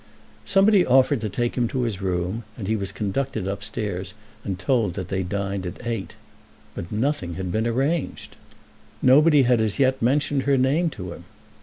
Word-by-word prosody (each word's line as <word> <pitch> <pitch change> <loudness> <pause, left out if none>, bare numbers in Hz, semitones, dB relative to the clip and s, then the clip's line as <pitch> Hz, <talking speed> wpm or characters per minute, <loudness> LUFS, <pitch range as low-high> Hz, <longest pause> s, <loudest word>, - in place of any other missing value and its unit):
Somebody 195 0 +5
offered 130 -1 +3
to 110 - -2
take 120 +4 -1
him 120 -2 +1
to 125 +2 -2
his 105 -5 -3
room, 90 +3 -1 0.2
and 100 -5 -5
he 110 - +1
was 100 -3 -2
conducted 105 0 -2
upstairs, 100 -1 -4 0.3
and 95 -3 -3
told 105 -1 0
that 95 -2 -5
they 95 -1 -1
dined 100 +1 -3
at 90 +7 -8
eight, 115 -7 -4 0.6
but 85 - -7
nothing 110 - -1
had 90 0 -4
been 110 +4 0
arranged. 135 +7 -2 0.7
Nobody 145 +2 +6
had 120 -2 +3
as 110 -2 0
yet 130 -1 +2
mentioned 140 +3 +2
her 140 - +4
name 145 +7 +2
to 90 - -7
him. 85 - -13
110 Hz, 175 wpm, -24 LUFS, 95-135 Hz, 0.7 s, Nobody